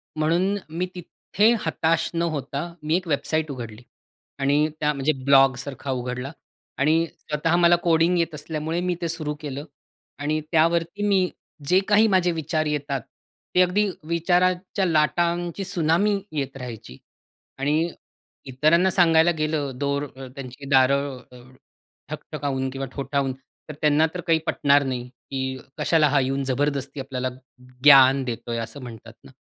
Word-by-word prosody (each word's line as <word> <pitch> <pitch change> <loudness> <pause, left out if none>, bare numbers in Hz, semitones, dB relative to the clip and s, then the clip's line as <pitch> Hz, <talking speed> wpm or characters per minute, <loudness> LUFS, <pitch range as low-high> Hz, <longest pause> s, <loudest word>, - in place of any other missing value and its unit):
म्हणून 170 +6 +1
मी 170 +3 -2
तिथे 205 +5 +1
हताश 160 0 +1
न 170 - -1
होता, 155 0 -3
मी 155 +2 +1
एक 185 -1 -6
वेबसाईट 155 +1 -1
उघडली 115 -4 -8 0.6
आणि 145 +2 +2
त्या 150 0 +2
म्हणजे 140 +2 +1
ब्लॉग 135 -1 +6
सारखा 135 0 -5
उघडला 125 +1 -4 0.5
आणि 160 +4 +3
स्वतः 155 +2 -1
मला 175 0 +5
कोडिंग 170 +1 +3
येत 165 -1 -1
असल्यामुळे 160 +2 -3
मी 180 0 -1
ते 170 - -1
सुरू 155 -2 -2
केलं 145 0 -6 0.5
आणि 150 +2 -1
त्यावरती 170 +4 +1
मी 190 -3 +2 0.4
जे 180 +4 +5
काही 215 +1 +5
माझे 185 -3 +2
विचार 160 -1 -1
येतात 145 -3 -2 0.5
ते 180 - +6
अगदी 195 +3 +2 0.2
विचाराच्या 180 +3 +1
लाटांची 170 +2 +1
त्सुनामी 185 +3 +1
येत 140 -3 -4
राहायची 115 - -9 0.6
आणि 150 +5 +1 0.6
इतरांना 155 +8 +3
सांगायला 165 -2 +4
गेलं 155 -2 -1
दोर 140 0 -1
अ, 135 -1 -8
त्यांची 135 0 -9
दारं 130 -2 0 0.6
ठकठकावून 135 -2 -3
किंवा 135 +1 -5
ठोठावून 140 -1 -1 0.4
तर - - -5
त्यांना 150 +1 +4
तर 180 - -4
काही 165 -1 +4
पटणार 140 0 +3
नाही, 125 -2 -3 0.2
की 130 -1 -3 0.2
"कशाला 160 -2 +3
हा 145 0 +3
येऊन 135 +1 -1
जबरदस्ती 140 +1 -1
आपल्याला 130 -1 -3 0.5
ज्ञान 135 -2 +7
देतोय," 120 -1 -4
असं 115 +5 -7
म्हणतात 115 -2 -10
ना. - - -15
150 Hz, 140 wpm, -24 LUFS, 135-170 Hz, 0.6 s, ज्ञान